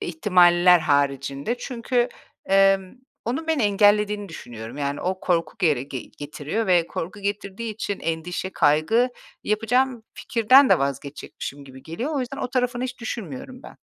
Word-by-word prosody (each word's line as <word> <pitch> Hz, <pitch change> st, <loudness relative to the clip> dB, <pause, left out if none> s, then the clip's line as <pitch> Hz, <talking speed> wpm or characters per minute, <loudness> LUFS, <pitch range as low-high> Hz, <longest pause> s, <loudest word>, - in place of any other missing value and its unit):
ihtimaller 175 Hz, 0 st, +4 dB
haricinde. 140 Hz, -, 0 dB
Çünkü, 245 Hz, 0 st, -1 dB, 0.4 s
emm, 195 Hz, -1 st, +3 dB, 0.3 s
onun 265 Hz, +8 st, -3 dB
beni 320 Hz, -6 st, +1 dB
engellediğini 205 Hz, 0 st, +3 dB
düşünüyorum. 120 Hz, -6 st, -9 dB
Yani, 140 Hz, 0 st, -2 dB
o 185 Hz, +1 st, -2 dB
korku 170 Hz, +1 st, 0 dB
gere 155 Hz, -9 st, +2 dB
ge 135 Hz, -1 st, -6 dB, 0.2 s
getiriyor 150 Hz, +9 st, -4 dB
ve 175 Hz, -2 st, +3 dB
korku 185 Hz, +5 st, -6 dB
getirdiği 200 Hz, +2 st, -4 dB
için 205 Hz, -2 st, -4 dB
endişe, 165 Hz, +3 st, -3 dB
kaygı 155 Hz, +12 st, +3 dB, 0.4 s
yapacağım 235 Hz, +3 st, +1 dB
fikirden 255 Hz, +4 st, +4 dB
de -, -, +6 dB
vazgeçecekmişim 140 Hz, +1 st, -5 dB
gibi 130 Hz, -1 st, -13 dB
geliyor. 240 Hz, -, -4 dB
O 280 Hz, -, 0 dB
yüzden 250 Hz, -, -5 dB
o -, -, -3 dB
tarafını 250 Hz, -1 st, 0 dB
hiç 255 Hz, -1 st, -6 dB
düşünmüyorum 255 Hz, +3 st, -6 dB
ben. -, -, -12 dB
195 Hz, 145 wpm, -23 LUFS, 155-235 Hz, 0.4 s, de